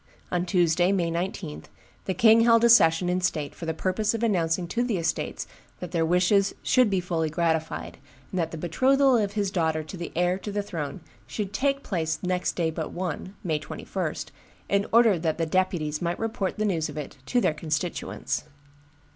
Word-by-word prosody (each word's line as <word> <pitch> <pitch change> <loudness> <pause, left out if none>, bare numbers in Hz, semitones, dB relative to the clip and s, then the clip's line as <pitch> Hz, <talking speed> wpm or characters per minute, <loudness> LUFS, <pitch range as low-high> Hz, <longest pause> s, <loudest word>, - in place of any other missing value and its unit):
On 180 - +1
the 180 - -4
Tuesday, 175 0 +3
May 175 -4 +1
19, 170 -2 -4 0.4
the 190 - -2
king 225 +4 +6
held 230 0 +5
a 235 - +6
session 165 -6 +6
in 180 +1 0
state 155 -5 -1
for 165 - -8
the 160 - 0
purpose 210 +5 0
of 230 - -3
announcing 175 -5 +1
to 235 - 0
the 240 -5 0
estates 165 -1 -2 0.3
that 180 - -6
their 170 -2 +1
wishes 185 +3 +3
should 255 -4 +4
be 195 -2 +1
fully 170 -3 -1
gratified, 160 0 -2 0.3
and 185 - -2
that 165 -2 0
the 165 - -7
betrothal 260 - +3
of 205 -3 +1
his 205 -2 -1
daughter 160 -3 0
to 155 +5 -9
the 170 - -6
heir 180 +2 +1
to 205 - -6
the 205 0 -1
throne 160 -3 -5 0.3
should 205 -2 -4
take 275 +4 0
place 160 -5 -1
next 180 0 0
day 165 -2 0
but - - -4
one, 185 +2 -4
May 160 -5 0
21, 150 - -4 0.5
in 200 0 +1
order 225 -6 +5
that 160 -1 -1
the 165 - 0
deputies 160 -3 0
might 175 0 -1
report 220 -4 -2
the 215 - 0
news 165 -6 0
of 150 - -8
it 145 -1 -6
to 245 - +2
their 165 - +2
constituents. 155 0 -3
180 Hz, 195 wpm, -26 LUFS, 165-205 Hz, 0.5 s, king